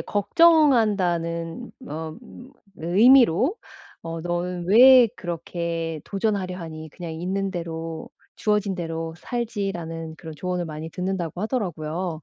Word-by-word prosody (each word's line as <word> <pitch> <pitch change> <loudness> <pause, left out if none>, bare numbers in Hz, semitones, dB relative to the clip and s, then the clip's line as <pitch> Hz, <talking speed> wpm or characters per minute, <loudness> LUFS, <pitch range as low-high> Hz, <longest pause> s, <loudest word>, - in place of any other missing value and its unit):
걱정한다는 205 - +2 0.2
어 160 0 -5 0.6
의미로 235 - +5 0.5
어 165 -1 -6
"너는 175 0 -3
왜 250 +4 +8
그렇게 170 -1 -4
도전하려 195 -3 -2
하니. 160 -2 -8
그냥 165 +1 -8
있는 190 +4 -2
대로 165 -2 -5 0.3
주어진 210 -2 0
대로 165 -2 -4
살지." 225 -5 -3
라는 165 -1 -6
그런 160 -2 -9
조언을 180 +2 -3
많이 155 0 -6
듣는다고 180 0 -3
하더라고요. 175 - -3
175 Hz, 260 characters per minute, -24 LUFS, 165-205 Hz, 0.6 s, 왜